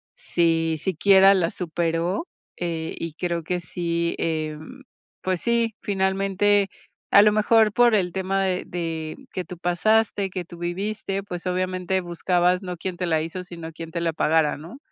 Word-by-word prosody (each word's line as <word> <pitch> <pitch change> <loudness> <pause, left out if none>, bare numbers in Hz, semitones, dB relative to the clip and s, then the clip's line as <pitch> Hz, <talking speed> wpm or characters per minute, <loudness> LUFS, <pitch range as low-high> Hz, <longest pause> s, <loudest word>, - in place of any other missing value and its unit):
si 165 -1 +1
siquiera 195 +3 +5
la 175 -4 +1
superó, 170 - -2 0.3
eh, 165 -2 -3
y 165 -2 -4
creo 170 0 -2
que 180 +3 -2
sí, 170 0 -2
em, 155 - -4 0.4
pues 185 -2 -1
sí, 235 -1 +1
finalmente, 195 +1 +1 0.4
a 200 - +9
lo 210 - +5
mejor 215 0 +4
por 240 -1 +5
el 180 -4 +1
tema 190 0 0
de 185 -1 0
de 165 -2 -4 0.2
que 185 - -3
tú 180 - -9
pasaste, 200 +3 +1
que 185 -1 -5
tú 175 - -12
viviste, 195 +3 -3
pues 180 -3 -7
obviamente 185 0 -1
buscabas 175 +1 +1
no 180 -1 -5
quién 180 +1 -5
te 180 - -2
la 160 -2 +2
hizo, 165 +3 -5
sino 170 -2 -8
quién 165 0 -8
te 170 - -3
la 165 -1 0
pagara, 155 -1 +2
¿no? 170 - -10
180 Hz, 165 wpm, -24 LUFS, 165-195 Hz, 0.4 s, a